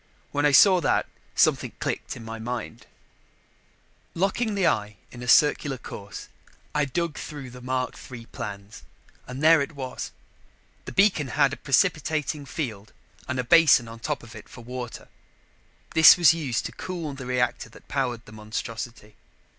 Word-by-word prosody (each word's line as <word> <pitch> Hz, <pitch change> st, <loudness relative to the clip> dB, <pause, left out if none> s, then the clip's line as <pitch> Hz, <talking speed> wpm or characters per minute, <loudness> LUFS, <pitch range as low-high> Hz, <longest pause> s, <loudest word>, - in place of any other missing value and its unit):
When 145 Hz, +1 st, +2 dB
I -, -, +3 dB
saw 185 Hz, +6 st, +7 dB
that, -, -, +1 dB, 0.3 s
something -, -, +2 dB
clicked -, -, -3 dB
in 115 Hz, -, -10 dB
my 115 Hz, 0 st, -7 dB
mind. 120 Hz, -1 st, -6 dB, 1.3 s
Locking 200 Hz, +5 st, 0 dB
the 195 Hz, -2 st, +1 dB
eye 105 Hz, -9 st, 0 dB
in 120 Hz, -, -10 dB
a 125 Hz, -, -7 dB
circular 145 Hz, +1 st, +4 dB
course, 100 Hz, -4 st, -9 dB, 0.5 s
I 150 Hz, 0 st, +2 dB
dug 165 Hz, +2 st, -3 dB
through 140 Hz, -4 st, -8 dB
the 125 Hz, 0 st, -11 dB
Mark 130 Hz, 0 st, -2 dB, 0.2 s
III 120 Hz, -2 st, -8 dB
plans 100 Hz, -2 st, -8 dB, 0.5 s
and 130 Hz, +3 st, -6 dB
there 160 Hz, -1 st, +7 dB
it 140 Hz, +3 st, -4 dB
was. 130 Hz, -2 st, -5 dB, 0.8 s
The -, -, -6 dB
beacon 190 Hz, -8 st, +3 dB
had 140 Hz, +1 st, +2 dB
a -, -, -2 dB
precipitating 150 Hz, -1 st, 0 dB
field 110 Hz, -9 st, -5 dB, 0.3 s
and 130 Hz, -, -3 dB
a 125 Hz, -, 0 dB
basin 145 Hz, -3 st, +5 dB
on 115 Hz, 0 st, -10 dB
top -, -, -3 dB
of 115 Hz, -2 st, -12 dB
it 110 Hz, -, -12 dB
for 125 Hz, -, -12 dB
water; 125 Hz, 0 st, -7 dB, 0.9 s
this 160 Hz, +2 st, +9 dB
was 170 Hz, -2 st, +6 dB
used 140 Hz, -8 st, -2 dB
to -, -, -4 dB
cool 170 Hz, -5 st, -5 dB
the 135 Hz, -2 st, -8 dB
reactor 125 Hz, -1 st, -1 dB
that -, -, -17 dB
powered 125 Hz, -5 st, -2 dB
the -, -, -14 dB
monstrosity. 110 Hz, 0 st, -6 dB
130 Hz, 160 wpm, -25 LUFS, 115-155 Hz, 1.3 s, this